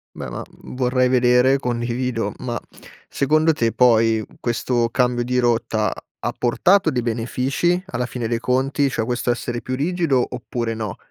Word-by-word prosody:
Beh -, -, -6 dB
ma -, -, -5 dB, 0.2 s
vorrei 125 Hz, 0 st, 0 dB
vedere, 125 Hz, +1 st, +4 dB
condivido. 120 Hz, -1 st, -2 dB
Ma 120 Hz, -3 st, -3 dB, 0.5 s
secondo 155 Hz, +3 st, +2 dB
te 115 Hz, -7 st, 0 dB
poi 115 Hz, -3 st, +3 dB, 0.2 s
questo 120 Hz, 0 st, 0 dB
cambio 125 Hz, 0 st, +1 dB
di 125 Hz, +1 st, 0 dB
rotta 115 Hz, -3 st, +1 dB, 0.3 s
ha -, -, -2 dB
portato 170 Hz, +8 st, +3 dB
dei 125 Hz, -, 0 dB
benefici 130 Hz, +10 st, 0 dB
alla 125 Hz, 0 st, -2 dB
fine 125 Hz, -2 st, -4 dB
dei 115 Hz, 0 st, 0 dB
conti, 135 Hz, +3 st, +1 dB
cioè 115 Hz, -, -1 dB
questo 120 Hz, 0 st, 0 dB
essere 120 Hz, -1 st, -3 dB
più 130 Hz, -, -3 dB
rigido 150 Hz, -3 st, +1 dB
oppure 115 Hz, -1 st, -3 dB
no? 110 Hz, -4 st, -5 dB
125 Hz, 150 wpm, -21 LUFS, 120-130 Hz, 0.5 s, vedere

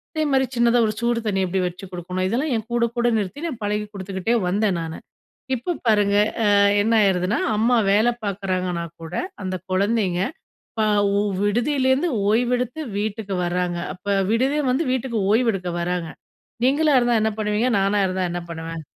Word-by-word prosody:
அதேமாதிரி 285 Hz, -4 st, +2 dB
சின்னதா 235 Hz, 0 st, +3 dB
ஒரு 215 Hz, -, -1 dB
சூடு 235 Hz, 0 st, +1 dB
தண்ணி 195 Hz, -2 st, 0 dB
எப்படி 185 Hz, +1 st, -1 dB
வச்சு 180 Hz, +2 st, -8 dB
கொடுக்கணும்? 180 Hz, +1 st, -3 dB
இதெல்லாம் 260 Hz, +9 st, -1 dB
என் 220 Hz, 0 st, -3 dB
கூட, 235 Hz, 0 st, +2 dB
கூட 240 Hz, 0 st, +2 dB
நிறுத்தி 215 Hz, -, -4 dB
நான் 250 Hz, -9 st, -6 dB
பழகி 210 Hz, +1 st, -1 dB
குடுத்துக்கிட்டே 195 Hz, +3 st, -2 dB
வந்தேன் 200 Hz, 0 st, +1 dB
நானு. 160 Hz, 0 st, -5 dB, 0.6 s
இப்ப 320 Hz, +9 st, -3 dB
பாருங்க 205 Hz, -2 st, +3 dB, 0.3 s
அ -, -, +3 dB, 0.4 s
என்ன 225 Hz, +2 st, +1 dB
ஆயிருதுனா, 190 Hz, +1 st, +1 dB, 0.2 s
அம்மா 235 Hz, +3 st, +3 dB, 0.2 s
வேல 215 Hz, +4 st, +4 dB, 0.2 s
பார்க்குறாங்கனா 185 Hz, -3 st, -2 dB, 0.2 s
கூட, 165 Hz, +2 st, -8 dB, 0.3 s
அந்த 185 Hz, 0 st, -2 dB, 0.2 s
குழந்தைங்க 195 Hz, -2 st, +1 dB, 0.6 s
ப -, -, +3 dB, 0.3 s
ஓ -, -, +3 dB, 0.2 s
விடுதிலேருந்து 260 Hz, -, +1 dB, 0.2 s
ஓய்வெடுத்து 245 Hz, +5 st, 0 dB, 0.2 s
வீட்டுக்கு 205 Hz, -1 st, -3 dB
வராங்க 175 Hz, 0 st, -1 dB, 0.2 s
அப்ப 180 Hz, -, -18 dB, 0.3 s
விடுதிய 265 Hz, +6 st, +1 dB
வந்து 265 Hz, +6 st, +1 dB
வீட்டுக்கு 255 Hz, -2 st, -1 dB
ஓய்வெடுக்க 215 Hz, -6 st, +1 dB
வராங்க, 175 Hz, -1 st, -2 dB, 0.6 s
நீங்களா 290 Hz, +1 st, +3 dB
இருந்தா 240 Hz, -2 st, +2 dB
என்ன 220 Hz, 0 st, +1 dB
பண்ணுவீங்க? 210 Hz, +3 st, +1 dB
நானா 200 Hz, +1 st, +2 dB
இருந்தா 185 Hz, 0 st, -1 dB
என்ன 175 Hz, -, -3 dB
பண்ணுவேன்? 165 Hz, 0 st, -6 dB
210 Hz, 155 wpm, -22 LUFS, 185-240 Hz, 0.6 s, வேல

